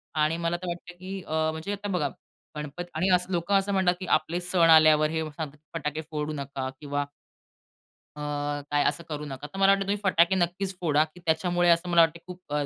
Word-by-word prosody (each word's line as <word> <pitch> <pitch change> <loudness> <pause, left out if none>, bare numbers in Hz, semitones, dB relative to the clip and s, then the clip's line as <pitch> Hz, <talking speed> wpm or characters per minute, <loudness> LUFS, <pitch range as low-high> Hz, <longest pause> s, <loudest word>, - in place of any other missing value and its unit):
आणि 155 +2 +2
मला 175 +1 0
तर - - -4
वाटतं 175 +1 -6
की 190 +1 -6
अ, 160 0 +1
म्हणजे 160 +6 -5
आता 205 +1 -5
बघा 160 -7 0 0.5
गणपत 150 +4 -5
आणि 165 +4 0 0.2
लोक 170 +2 -2
असं 195 +1 +3
म्हणतात 185 -2 +3
की 185 - -5
आपले 170 +3 -4
सण 175 -2 +3
आल्यावर 155 -1 +6
हे 160 0 -1
सांगतात 150 -1 -6 0.2
फटाके 150 -1 -3
फोडू 150 0 -2
नका 140 -2 -4
किंवा 145 -1 -2 1.1
अ, - - -8 0.5
काय 145 0 +2
असं 170 - -3
करू 150 -1 -4
नका. 140 0 -7
तर 195 - -10
मला 195 0 +5
वाटत 195 - +2
तुम्ही 200 +1 0
फटाके 185 -1 +4
नक्कीच 185 +2 -1
फोडा 155 -3 +3
की 160 +3 -15
त्याच्यामुळे 175 +2 +2
असं 170 +1 +3
मला 170 -1 +5
वाटतं 165 0 +4
खूप 180 -4 -11
165 Hz, 200 wpm, -27 LUFS, 150-180 Hz, 1.1 s, आल्यावर